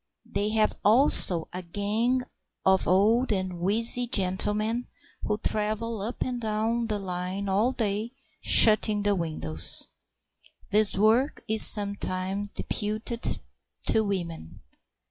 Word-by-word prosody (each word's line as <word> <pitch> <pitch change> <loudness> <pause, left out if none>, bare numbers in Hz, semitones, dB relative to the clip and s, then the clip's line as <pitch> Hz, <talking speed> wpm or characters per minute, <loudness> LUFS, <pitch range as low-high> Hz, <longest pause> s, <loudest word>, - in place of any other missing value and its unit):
They 205 +1 -3
have 215 -1 +2
also 205 - +5
a 180 - -5
gang 215 +8 -2 0.4
of 190 0 +2
old 220 +7 +2
and 185 -3 -3
wheezy 230 +6 +3
gentlemen 210 +4 -1 0.3
who 210 - -2
travel 215 +1 -3
up 225 +5 -4
and 245 -2 -5
down 225 +2 -2
the 210 -2 -2
line 185 +1 -5
all 205 +6 +1
day 220 0 -3 0.3
shutting 215 -1 +4
the 205 0 +2
windows. 120 - -3 0.8
This 210 -1 +3
work 225 +8 +1
is 220 0 +3
sometimes 200 -1 -1
deputed 215 +3 -4 0.5
to 220 - +2
women. 170 - -6
210 Hz, 115 wpm, -26 LUFS, 190-225 Hz, 0.8 s, also